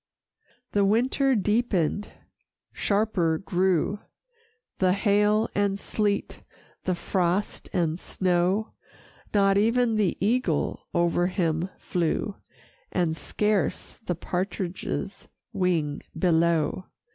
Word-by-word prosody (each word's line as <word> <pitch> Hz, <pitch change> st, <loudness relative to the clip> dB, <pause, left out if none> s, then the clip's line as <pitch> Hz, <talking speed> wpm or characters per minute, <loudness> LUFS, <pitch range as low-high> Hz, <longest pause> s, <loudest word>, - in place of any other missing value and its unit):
VI -, -, -43 dB, 0.2 s
The 200 Hz, -1 st, +3 dB
winter 255 Hz, +6 st, +2 dB
deepened, 205 Hz, -3 st, +1 dB, 0.6 s
sharper 200 Hz, -6 st, +1 dB
grew 185 Hz, +2 st, +1 dB, 0.8 s
The 185 Hz, -1 st, +4 dB
hail 210 Hz, +2 st, +3 dB
and 200 Hz, -1 st, +1 dB
sleet, 205 Hz, 0 st, -2 dB, 0.4 s
the 185 Hz, -, +1 dB
frost 180 Hz, +2 st, -1 dB
and 170 Hz, -3 st, 0 dB
snow, 185 Hz, +4 st, 0 dB, 0.6 s
Not 195 Hz, -1 st, +4 dB
e'en 230 Hz, +1 st, +2 dB
the 205 Hz, -4 st, +1 dB
eagle 205 Hz, -, 0 dB
o'er 175 Hz, +1 st, +2 dB
him 175 Hz, -2 st, 0 dB
flew, 175 Hz, +3 st, -1 dB, 0.6 s
And 170 Hz, -3 st, +1 dB
scarce 210 Hz, -1 st, -1 dB
the 175 Hz, -, 0 dB
partridge's 180 Hz, +1 st, -4 dB, 0.3 s
wing 170 Hz, -7 st, 0 dB, 0.2 s
below. 170 Hz, -1 st, +2 dB
190 Hz, 95 wpm, -26 LUFS, 175-210 Hz, 0.8 s, The